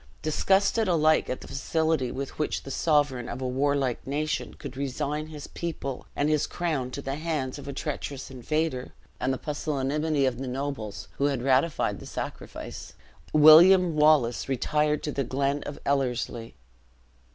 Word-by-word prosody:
Disgusted 195 +7 +2
alike 155 -3 +3
at 125 - -3
the - - -10
facility 160 -2 0
with 140 +2 -6
which 155 - -1
the 135 - -7
sovereign 145 -5 +1
of - - -5
a 130 - -2
warlike 135 -1 0
nation 150 +2 -2
could - - -8
resign 145 +3 -2
his 150 -2 -8
people 145 -6 -5
and 145 - +1
his 150 -1 +2
crown 160 -7 -1
into 130 +3 -6
the 135 +1 -3
hands 155 -5 -2
of - - -10
a - - -3
treacherous 140 -1 -5
invader, 135 +1 -2 0.2
and 130 - 0
at 130 - -2
the - - -24
pusillanimity 150 0 0
of 130 -2 -1
the 135 - -4
nobles 130 -5 -4
who 140 - +2
had 135 -4 0
ratified 135 +4 +2
the - - -10
sacrifice, - - -7 0.4
William 165 +3 +8
Wallace 150 -6 +3
retired 150 +3 +1
to 150 - -2
the 140 - -1
glen 140 +3 -1
of 145 - -6
Ellerslie. 125 -4 -1
145 Hz, 165 wpm, -27 LUFS, 130-155 Hz, 0.4 s, William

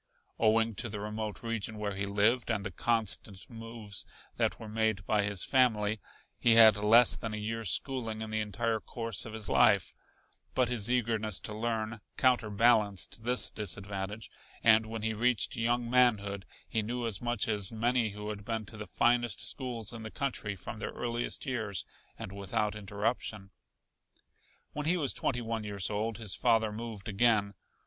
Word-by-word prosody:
Owing 115 0 +3
to 120 - -2
the 105 -1 -5
remote 105 +1 -4
region 110 -2 -2
where 105 -1 -3
he 100 +1 -3
lived 105 +5 +2
and 110 -4 -1
the 95 - -3
constant 110 -2 -1
moves 115 -3 -5 0.3
that - - 0
were 110 - -8
made 110 -2 0
by 105 -1 +2
his 100 -2 -1
family, 110 -5 +2 0.4
he 115 -1 +5
had 110 -3 +9
less 110 +3 +6
than 110 -1 -5
a - - -5
year's 110 0 0
schooling 115 -5 +1
in 110 - -7
the 110 0 0
entire 110 +2 -1
course 115 -2 -5
of 110 - -9
his 110 -2 -4
life, - - +4 0.6
but 125 -2 +2
his 120 -3 +1
eagerness 110 -5 0
to 105 - -6
learn 110 0 -3 0.2
counterbalanced 110 -3 +2
this 125 +1 +2
disadvantage 100 +1 -4 0.3
and 110 -1 +5
when 110 -1 -5
he 110 0 0
reached 120 +3 +1
young 120 0 0
manhood 105 -6 +2 0.2
he 110 - 0
knew 120 +3 -3
as 110 -4 0
much 120 -3 -1
as 105 -3 +1
many 115 +1 +1
who 105 +1 -7
had 105 -1 -6
been 110 0 -3
to 110 - -11
the 105 -1 -7
finest 120 +1 +2
schools 120 -5 -2
in 115 - -7
the 110 - -6
country 120 -7 -2
from 95 +3 -8
their - - -4
earliest 120 +3 -3
years 110 - -3 0.3
and - - -7
without 105 +2 -2
interruption. 105 -1 -3 1.2
When 150 +1 -3
he 180 +2 +3
was 145 -6 +4
twenty 120 -2 -1
one 115 -1 -3
years 100 -1 -2
old 110 +2 -2
his 110 -4 -2
father 115 -3 +2
moved 110 -1 -7
again. 105 -1 +2
110 Hz, 170 wpm, -31 LUFS, 105-115 Hz, 1.2 s, had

